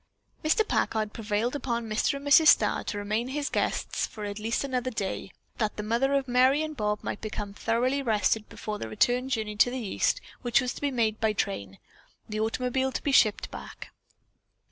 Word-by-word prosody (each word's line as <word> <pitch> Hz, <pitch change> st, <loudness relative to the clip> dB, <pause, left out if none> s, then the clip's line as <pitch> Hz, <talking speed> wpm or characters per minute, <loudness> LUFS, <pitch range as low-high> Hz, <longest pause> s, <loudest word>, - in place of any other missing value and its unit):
Mr. 420 Hz, +8 st, +2 dB
Packard 215 Hz, -1 st, 0 dB
prevailed 225 Hz, +3 st, -1 dB
upon 235 Hz, -5 st, -2 dB
Mrs. 215 Hz, +5 st, +1 dB
and 280 Hz, +1 st, -6 dB
Mr. 310 Hz, +2 st, +7 dB
Starr 215 Hz, -7 st, +5 dB
to -, -, -3 dB
remain 215 Hz, +4 st, -1 dB
as 265 Hz, -, -5 dB
his 295 Hz, -1 st, -1 dB
guests -, -, -1 dB
for 210 Hz, -2 st, -7 dB
at 205 Hz, +1 st, -5 dB
least 225 Hz, +5 st, -1 dB
another 255 Hz, -2 st, -1 dB
day, 195 Hz, -4 st, -4 dB, 0.3 s
that 215 Hz, -2 st, -1 dB
the 210 Hz, -, -3 dB
mother 240 Hz, +6 st, +1 dB
of 275 Hz, -1 st, 0 dB
Merry 260 Hz, +4 st, +4 dB
and 310 Hz, -1 st, -5 dB
Bob 210 Hz, -3 st, -1 dB
might -, -, -4 dB
become 210 Hz, -2 st, -5 dB
thoroughly 245 Hz, +6 st, 0 dB
rested 215 Hz, -3 st, +1 dB
before 210 Hz, -1 st, -5 dB
the 110 Hz, -, -5 dB
return 245 Hz, -, +1 dB
journey 220 Hz, -4 st, -2 dB
to 245 Hz, -, +5 dB
the 255 Hz, -, -4 dB
East, 235 Hz, -, 0 dB, 0.2 s
which 240 Hz, -2 st, +3 dB
was 250 Hz, 0 st, -1 dB
to -, -, -10 dB
be 285 Hz, -, +1 dB
made 225 Hz, -5 st, 0 dB
by 220 Hz, -1 st, +2 dB
train, 100 Hz, -, -3 dB, 0.5 s
the 215 Hz, 0 st, -4 dB
automobile 250 Hz, +4 st, 0 dB
to -, -, -4 dB
be 285 Hz, -, +1 dB
shipped 220 Hz, -5 st, +3 dB
back. -, -, -9 dB
230 Hz, 200 wpm, -28 LUFS, 210-260 Hz, 0.5 s, Mr